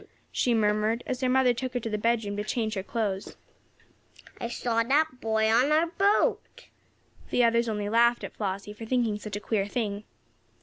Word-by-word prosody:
she 250 - +1
murmured, 215 +1 +1
as 255 0 -3
her 255 - +1
mother 255 -1 +4
took 255 +1 -5
her - - +1
to 225 - -5
the 215 - -2
bedroom 220 -1 0
to 205 - -2
change 220 0 -2
her 195 - -2
clothes. 200 -2 -3 1.0
"I - - -3
saw 235 -1 -1
that 270 +2 +1
boy 220 -1 +1
on 240 +6 +3
our 315 +2 +4
boat." 390 +5 0 0.6
The 245 - +2
others 235 0 +3
only 210 -1 -2
laughed 235 +2 +3
at - - -6
Flossie 200 0 -4
for 225 +1 -9
thinking 230 -4 0
such 210 -1 -6
a - - -3
queer 210 -2 -1
thing. 205 -2 -3
230 Hz, 185 wpm, -27 LUFS, 210-245 Hz, 1.0 s, mother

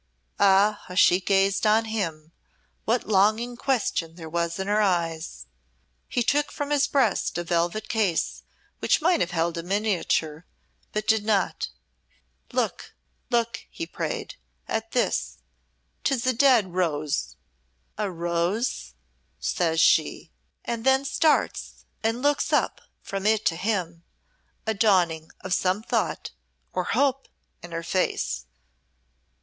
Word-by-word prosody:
Ah, 200 +1 +4
how 180 - -8
she 180 0 +6
gazed 195 +2 +2
on 220 +2 +4
him, 165 -8 -3 0.5
what 235 +2 +1
longing 215 +4 +2
question 225 -11 -1
there 165 -2 -9
was 170 +1 -1
in 190 - -3
her 210 +2 +2
eyes! 165 - -1 0.6
He 245 - +1
took 290 +4 +1
from 290 0 -4
his 290 -1 +3
breast 245 -11 +1
a 175 - -2
velvet 175 +5 -1
case 205 -7 0 0.4
which - - +2
might 345 +2 +3
have 175 - +1
held 170 -1 -1
a - - -2
miniature, 175 -4 -1 0.4
but 215 0 -3
did 220 -1 +3
not. 210 -2 0 0.8
"Look - - -2 0.3
look," 235 -1 -1
he 335 - -5
prayed, - - -5 0.3
"at 225 0 -3
this. 245 - 0 0.7
Tis 265 -4 0
a 255 - +3
dead 235 -7 +4
rose." 155 -5 -1 0.6
"A 210 - -2
rose!" 170 - -2 0.4
says 165 -2 0
she, - - +3 0.3
and 235 -1 -3
then 265 +1 +3
starts 300 +2 0 0.2
and 225 +3 -1
looks 290 0 +2
up - - +1 0.2
from 195 +1 -3
it 220 0 +2
to 165 - +2
him, 175 -3 -2 0.6
a 220 - +1
dawning 180 -7 +2
of 185 - -2
some 190 +3 +1
thought - - -1 0.4
or - - -1
hope 275 -1 +1 0.3
in 175 - -10
her 165 0 -4
face. 165 - -1
200 Hz, 135 wpm, -25 LUFS, 170-230 Hz, 0.8 s, she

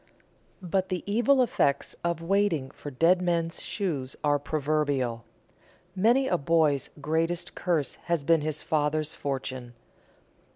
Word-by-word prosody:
But 185 +1 0
the 180 -1 -2
evil 240 +6 +3
effects 140 - 0
of 170 -1 -1
waiting 170 -7 +1
for 145 - -8
dead 165 +7 +3
men's 170 -2 -1
shoes 145 - -3
are 145 -1 +3
proverbial. 140 -5 -1 0.7
Many 235 +8 +3
a 175 - +1
boy's 150 -2 +2
greatest 165 +3 -1
curse 165 -6 -1
has 170 -4 0
been 165 +1 +3
his 155 0 -2
father's 155 0 0
fortune. 130 -3 -5
160 Hz, 125 wpm, -27 LUFS, 145-180 Hz, 0.7 s, evil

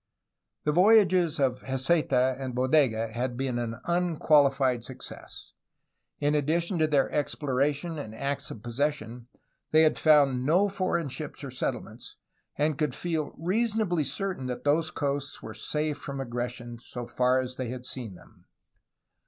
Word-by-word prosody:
The 150 - +2
voyages 180 -3 +4
of 130 -2 +1
Heceta 130 -1 +1
and 130 -2 -4
Bodega 125 -4 +2
had 120 +1 -3
been 130 -2 -1
an 115 -1 -3
unqualified 145 -7 +3
success. 130 +1 -10 0.7
In 145 0 +1
addition 165 +4 0
to 155 - +3
their 145 -3 +2
exploration 145 +2 -1
and 110 -6 -7
acts 140 +4 -3
of 110 - -9
possession, 120 -2 -2 0.4
they 155 +1 +5
had 155 - +3
found 140 -5 +4
no 175 +9 +3
foreign 185 -5 -1
ships 150 +2 -6
or 135 - -5
settlements, 125 - -5 0.4
and 150 0 0
could 150 -1 0
feel 160 -4 -2
rea 190 +9 +1
sonably 210 -8 0
certain 145 0 -3
that 125 -1 -4
those 155 +2 +2
coasts 140 -1 -3
were 110 - -7
safe 150 +6 -2
from 140 -1 -6
aggression 120 -1 -5
so 125 -1 -7
far 125 +2 +2
as 130 0 -4
they 130 -3 -3
had 125 0 -6
seen 120 -7 -5
them. - - -19
140 Hz, 150 wpm, -28 LUFS, 125-155 Hz, 0.7 s, they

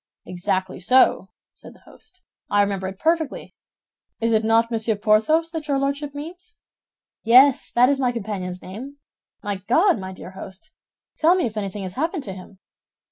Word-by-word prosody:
"Exactly 185 +1 -3
so," 255 +9 +3 0.2
said - - -14
the - - -22
host; 370 0 -15 0.3
"I 205 0 +3
remember 195 -2 -2
it 190 0 -7
perfectly. 320 - -1 0.7
It 230 0 +1
is 220 0 +2
not 225 +1 +2
Monsieur 220 -1 0
Porthos 220 +11 +2
that 320 -3 -5
your 280 -2 +1
Lordship 280 +1 -2
means?" 355 +8 -9 0.7
"Yes, 255 +4 +5
that 245 +1 +5
is 280 0 +1
my 250 -2 +1
companion's 195 -6 -5
name. 255 +10 -9 0.5
My 205 -1 -3
God, 330 - +3
my 190 0 -6
dear 185 0 -10
host, 190 0 -11 0.5
tell 330 +3 +5
me 365 - 0
if 220 - -4
anything 200 -1 -4
has 185 -1 -6
happened 320 - -2
to 195 - -6
him?" 190 +1 -12
230 Hz, 170 wpm, -22 LUFS, 195-285 Hz, 0.7 s, Yes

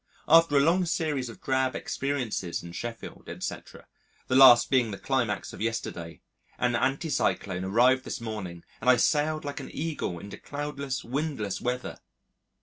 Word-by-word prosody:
After 165 -2 +6
a - - +6
long 175 +5 +3
series 150 -7 -1
of 115 - -12
drab 130 -1 +1
experiences 125 -12 -3
in 85 - -9
Sheffield, 115 +5 -7
etc., - - -7 0.4
the 130 - -1
last 130 -3 +8
being 125 -4 +3
the 100 - -5
climax 120 -6 -1
of - - -9
yesterday, 105 -7 -4 0.4
an 125 -1 +1
anti 135 +6 0
cyclone 95 -8 0
arrived 125 +6 +4
this - - -5
morning 105 -7 -6 0.2
and - - +2
I 125 - +7
sailed 150 +4 +1
like 145 0 -4
an - - -8
Eagle 150 - -3
into 100 +4 -9
cloudless, 140 -2 -4
windless 135 -6 -3
weather! 125 +1 -3
130 Hz, 155 wpm, -27 LUFS, 110-145 Hz, 0.4 s, last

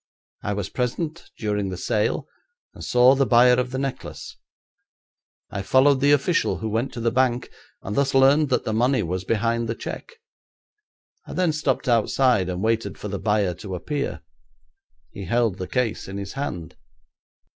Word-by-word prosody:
I 105 - -2
was 100 -2 -3
present 155 +7 -3
during 105 -2 -1
the 90 - -5
sale, 105 +3 -1 0.5
and - - -10
saw 125 +1 +5
the 135 -1 +2
buyer 125 +1 +6
of 125 0 -1
the 130 - -4
necklace. 135 -1 -5 1.2
I 100 - -3
followed 130 +7 +4
the 145 +1 +4
official 145 +4 +2
who 110 - -4
went 115 +5 -1
to - - -6
the 115 0 +1
bank, 125 -1 +1 0.3
and 105 - -4
thus 140 -1 +1
learned 140 +3 +5
that 130 - +1
the 110 - -1
money 125 +1 +2
was 90 +2 -3
behind 115 +1 0
the 115 - -1
cheque. 485 - -7 1.1
I - - -7
then 180 -3 +1
stopped 150 -3 -1
outside 120 -3 +2
and 90 +2 -3
waited 115 0 0
for 105 - -6
the 100 -1 -4
buyer 105 -4 +1
to 95 +1 -7
appear. 140 - -3 0.9
He 100 -3 -7
held 115 -1 0
the 95 - -4
case 125 -4 -1
in 95 0 -6
his 100 -1 -6
hand.' 90 - -5
115 Hz, 170 wpm, -23 LUFS, 105-135 Hz, 1.2 s, buyer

